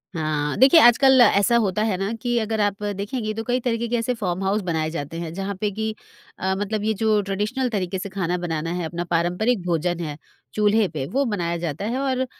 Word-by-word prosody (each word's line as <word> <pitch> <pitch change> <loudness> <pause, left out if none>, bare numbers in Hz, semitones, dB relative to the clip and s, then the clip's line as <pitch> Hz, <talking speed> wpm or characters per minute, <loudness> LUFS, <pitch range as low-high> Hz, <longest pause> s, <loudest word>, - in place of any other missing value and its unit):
हाँ, 155 -2 -1
देखिए 270 +6 +7
आजकल 260 0 +6
ऐसा 220 +1 +4
होता 210 -3 0
है 215 -3 0
ना 195 +3 -2
कि 240 -1 0
अगर 220 0 -2
आप 205 0 -1
देखेगीं 215 +2 -3
तो 225 - -3
कई 245 +2 0
तरीके 235 -1 -1
के 240 - -1
कैसे 235 +1 0
फॉर्म 190 -4 -3
हाउस 200 +3 +1
बनाए 160 -3 -1
जाते 165 0 -5
हैं। 165 -1 -5
जहाँ 195 +2 -4
पर 205 +3 -1
कि 220 0 -2 0.4
अ, 190 0 0
मतलब 205 +1 -2
ये 220 +1 +1
जो 215 0 +2
ट्रेडिशनल 210 +6 -2
तरीके 190 -4 -2
से 200 - -5
खाना 180 -2 -2
बनाना 165 -2 -3
है 175 -1 -2
अपना 170 +2 -4
पारम्परिक 180 +7 +1
भोजन 175 0 0
है 150 -4 -5 0.4
चूल्हे 210 0 +3
पे, 150 -6 -4
वो 265 - 0
बनाया 175 -7 -2
जाता 165 +2 -4
है 240 +4 -2
और 260 -1 0
200 Hz, 220 wpm, -23 LUFS, 175-225 Hz, 0.4 s, देखिए